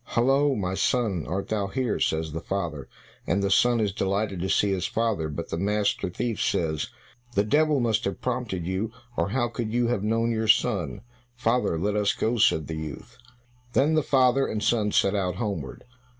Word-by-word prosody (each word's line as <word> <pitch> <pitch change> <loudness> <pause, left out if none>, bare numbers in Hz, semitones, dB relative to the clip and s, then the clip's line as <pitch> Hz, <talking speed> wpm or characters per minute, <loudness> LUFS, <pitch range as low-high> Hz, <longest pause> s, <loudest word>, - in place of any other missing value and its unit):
"Hollo, 135 +4 +2
my 95 -4 -2
son, 100 - 0
art 95 +5 -3
thou 105 -2 0
here?" 125 +1 -1
says 80 0 0
the 80 +1 -4
father, 85 -8 -4 0.4
and 100 +4 +1
the 100 - +1
son 120 +4 +4
is 105 -3 0
delighted 100 -1 -1
to 95 +2 -2
see 100 - +2
his 90 -2 -1
father, 110 -9 -1
but 80 +3 -5
the 80 - -3
master 100 -1 0
thief 115 +4 -3
says, 80 -3 0 0.5
"The 100 - +4
devil 150 +6 +3
must 115 -3 +1
have 100 - -3
prompted 120 -9 -3
you, 95 +5 -2 0.2
or 85 -1 0
how 120 +2 +1
could 120 -2 -4
you 120 0 +1
have 120 -5 0
known 115 +2 +1
your 110 -1 -1
son?" 95 - +2 0.3
"Father, 120 -7 +1
let 100 +5 -1
us 105 -1 +2
go," 115 +2 0
said 80 -7 +3
the 80 +2 -5
youth. 75 -4 -8 0.5
Then 145 +5 +3
the 155 - +3
father 135 -1 +3
and 105 0 -3
son 110 -2 +2
set 100 - +3
out 90 -3 -1
homeward. 95 - -4
105 Hz, 195 wpm, -26 LUFS, 90-120 Hz, 0.5 s, son